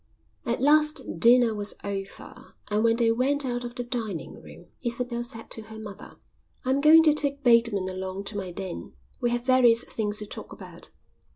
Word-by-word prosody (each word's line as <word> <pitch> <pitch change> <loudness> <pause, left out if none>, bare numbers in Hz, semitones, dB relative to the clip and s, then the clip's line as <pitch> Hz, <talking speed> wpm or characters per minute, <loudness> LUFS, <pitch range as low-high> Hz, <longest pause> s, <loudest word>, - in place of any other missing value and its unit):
At 235 - 0
last 300 - +2
dinner 235 +1 +5
was 205 -1 -1
over, 195 -1 -8 0.2
and 210 +1 +1
when 230 0 +3
they 230 -1 +3
went 270 +4 0
out 245 -1 -3
of 240 0 -7
the 245 - -4
dining 230 -7 -5
room - - -14 0.2
Isabel 240 0 -1
said 225 -1 -2
to 225 - -5
her 220 0 -11
mother: 215 -2 -10 0.5
"I'm 265 +2 +1
going 315 +2 +7
to 310 -2 +5
take 285 -1 0
Bateman 230 -5 +3
along 190 +1 -5
to 205 +1 -5
my 195 -3 -4
den. 175 - -7 0.3
We 240 - 0
have 240 0 -2
various 250 -2 +5
things 210 -2 -3
to 210 - -5
talk - - -9
about." - - -6
235 Hz, 185 wpm, -26 LUFS, 205-255 Hz, 0.5 s, going